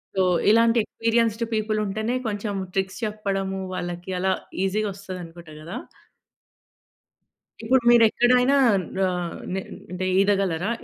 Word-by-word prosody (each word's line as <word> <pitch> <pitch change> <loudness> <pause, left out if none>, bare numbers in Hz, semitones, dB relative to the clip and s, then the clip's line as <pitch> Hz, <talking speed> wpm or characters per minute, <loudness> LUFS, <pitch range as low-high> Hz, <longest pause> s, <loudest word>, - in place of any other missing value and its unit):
So, 190 - +2 0.3
ఇలాంటి 230 +1 +4
experienced 230 0 0
people 215 0 0
ఉంటేనే 220 +5 -2
కొంచెం 205 -1 -3 0.2
ట్రిక్స్ 190 0 -2
చెప్పడము, 195 -2 -3
వాళ్ళకి 175 +1 -5
అలా 190 +1 +2 0.3
ఈజీగా 210 +2 0
వస్తది 190 -2 -8
అనుకుంట 165 -1 -13
కదా! 170 +4 -6 1.8
ఇప్పుడు 255 +3 +3
మీరు 240 -1 +7
ఎక్కడైనా 250 +3 +3 0.4
న - - 0 0.5
నే 190 - -2 0.3
అంటే 185 +1 -3
ఈదగలరా? 195 -2 +1
205 Hz, 115 wpm, -24 LUFS, 190-225 Hz, 1.8 s, మీరు